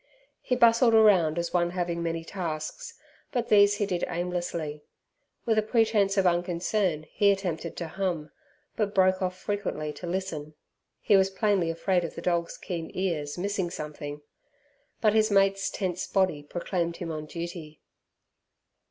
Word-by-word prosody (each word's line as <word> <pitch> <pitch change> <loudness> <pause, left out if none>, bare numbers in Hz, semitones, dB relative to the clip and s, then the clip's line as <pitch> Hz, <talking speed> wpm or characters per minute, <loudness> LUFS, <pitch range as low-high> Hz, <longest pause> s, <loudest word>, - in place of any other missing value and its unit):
He 250 - 0
bustled 235 -1 +5
around 185 -8 +5
as 170 0 -2
one 175 -1 +2
having 175 -1 -2
many 165 -1 -2
tasks, 165 - -5 0.3
but 245 -4 -2
these 205 -1 +6
he 205 - 0
did 180 -3 -2
aimlessly. 170 -4 -3 0.6
With 225 -2 +3
a - - +3
pretence 215 -3 +2
of 195 - +3
unconcern 175 -1 +1
he 205 - +3
attempted 175 -4 -3
to 170 - -4
hum, 170 -3 -3 0.4
but 210 -2 -1
broke 185 0 +4
off 185 0 -1
frequently 185 -7 -3
to 175 - -8
listen. 165 -5 -4 0.5
He 205 - +4
was 190 0 +4
plainly 195 -3 +1
afraid 175 +2 +1
of 170 - -5
the - - -6
dog's 170 -1 0
keen 170 -3 -5
ears 165 -6 -2
missing 190 -1 -1
something. 150 -2 -7 0.8
But 215 -2 +4
his 220 0 +3
mate's 195 -1 +3
tense 185 -2 -3
body 185 -7 +1
proclaimed 170 +2 -3
him 170 -2 -5
on 155 -1 -5
duty. 170 -2 -7
180 Hz, 150 wpm, -27 LUFS, 165-200 Hz, 0.8 s, these